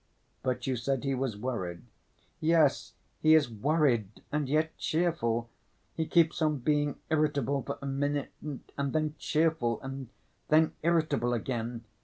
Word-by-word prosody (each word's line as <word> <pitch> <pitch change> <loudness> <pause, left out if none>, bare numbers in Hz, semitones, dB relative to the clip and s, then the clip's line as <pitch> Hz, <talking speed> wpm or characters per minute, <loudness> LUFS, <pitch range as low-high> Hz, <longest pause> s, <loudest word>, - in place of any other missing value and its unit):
"But 125 -1 -1
you 130 -2 0
said 130 +2 -1
he 135 -1 0
was 130 -5 -2
worried." 95 -8 -4 0.6
"Yes, 155 -8 +3 0.3
he 155 0 +7
is 145 -6 +3
worried 120 - +1
and 150 -2 -1
yet 155 +2 +1
cheerful. 120 -9 0 0.4
He 160 -1 -2
keeps 170 0 +3
on 155 -2 +2
being 145 +2 +1
irritable 145 -3 +1
for 140 - -5
a - - -4
minute 145 +1 -1
and 140 -1 -5
then 155 -1 0
cheerful 155 -7 +1
and 135 -2 -6 0.4
then 155 +1 +4
irritable 155 -7 +2
again. 115 0 -3
140 Hz, 140 wpm, -30 LUFS, 120-155 Hz, 0.6 s, he